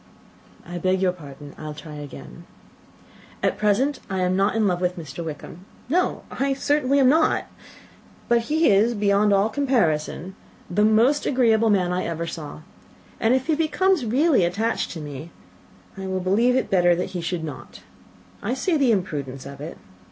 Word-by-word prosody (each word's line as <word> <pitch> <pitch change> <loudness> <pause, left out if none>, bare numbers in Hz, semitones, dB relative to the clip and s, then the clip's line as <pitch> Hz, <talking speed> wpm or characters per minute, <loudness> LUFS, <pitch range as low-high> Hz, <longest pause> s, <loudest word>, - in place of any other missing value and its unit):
"I 175 0 -5
beg 185 +2 +1
your 185 -1 +2
pardon. 145 -4 -11
I 155 - -8
will 150 - -6
try 150 0 -9
again. 145 -2 -10 1.0
At - - 0
present 255 +7 +1
I 190 -1 -1
am 180 0 +1
not 195 +3 +1
in 220 -1 +2
love 180 -2 0
with 180 0 -1
Mr. 160 0 -7
Wickham; 160 +3 -8 0.2
no, 360 +5 0
I 275 0 0
certainly 280 0 +1
am 265 - +5
not. 315 +4 +3 0.8
But 235 -1 +2
he 315 +2 +3
is, 220 +4 +3
beyond 205 0 +2
all 200 +1 +4
comparison, 190 - 0 0.4
the 210 +4 +2
most 230 +7 +3
agreeable 230 -4 +3
man 180 -4 +2
I 180 - -1
ever 170 0 -3
saw 155 -2 -7 0.6
and 230 +3 +3
if 260 0 -1
he 320 - +1
becomes 325 +2 +1
really 260 - +3
attached 205 +7 -1
to 165 - -7
me 150 +2 -8 0.7
I 195 -1 -7
believe 190 +7 +2
it - - +4
will - - +4
be - - -15
better 175 -2 +4
that 180 - -3
he 180 - -4
should 170 0 -3
not. 150 -4 -8 0.6
I 235 +5 -2
see 330 +4 0
the 270 -4 +3
imprudence 145 - -3
of 140 0 -9
it. 155 +3 -7
195 Hz, 180 wpm, -23 LUFS, 170-250 Hz, 1.0 s, am